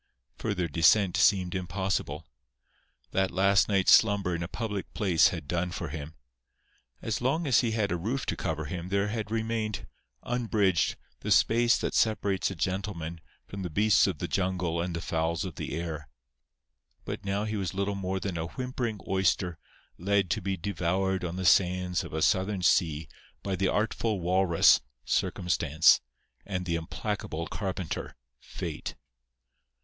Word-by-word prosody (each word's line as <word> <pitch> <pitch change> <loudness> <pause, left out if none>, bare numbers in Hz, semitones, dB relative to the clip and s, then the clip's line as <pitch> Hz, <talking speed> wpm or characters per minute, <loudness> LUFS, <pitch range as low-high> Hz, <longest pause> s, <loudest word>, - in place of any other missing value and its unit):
Further 95 -5 -1
descent 85 +5 +4
seemed 95 -3 +3
impossible. 90 -4 -2 0.9
That 95 0 +1
last 100 +3 +3
night's 100 -2 +3
slumber 100 -4 +5
in 85 - -2
a 85 - -3
public 105 -2 -4
place 90 -6 +4
had 70 - -4
done 90 +2 -1
for - - -5
him. 75 +1 -7 0.9
As 115 +1 -2
long 140 +7 +1
as 130 -4 +4
he 115 -2 0
had 110 - 0
had 100 - 0
a 90 - 0
roof 115 +10 -2
to - - -1
cover 80 -3 -3
him 90 +3 -5
there 100 +1 +1
had 110 -1 -3
remained, 110 -1 -2 0.4
unbridged, 110 -7 +1 0.2
the - - -5
space 115 0 +4
that - - -2
separates 100 -4 +1
a 95 - -6
gentleman 85 -2 -3 0.2
from 100 - -7
the 90 - -3
beasts 105 +4 +4
of 95 -5 -2
the - - -3
jungle 90 -3 -1
and 85 0 -3
the 85 - -3
fowls 80 +3 -1
of 90 - -5
the 70 - -5
air. 80 -5 -5 1.0
But - - -5
now 100 +1 -1
he 110 0 -3
was 95 -3 -3
little 100 +1 0
more 95 -1 -2
than 95 -4 -3
a 80 - -2
whimpering 125 -1 -4
oyster 90 -3 +1 0.4
led 100 0 +1
to 110 - 0
be 95 +1 -2
devoured 95 +1 -1
on 85 0 -3
the 95 0 -3
sands 90 -1 +3
of - - -8
a 80 0 -1
Southern 95 -1 +1
sea 80 -5 +2 0.4
by 100 -1 -1
the 95 +1 +1
artful 105 +1 0
walrus, 90 -1 +4 0.2
Circumstance, 85 -3 +3 0.4
and 90 -3 -4
the 85 - -1
implacable 85 0 -3
carpenter, 95 -4 -4 0.2
Fate. - - -6
95 Hz, 160 wpm, -28 LUFS, 85-105 Hz, 1.0 s, slumber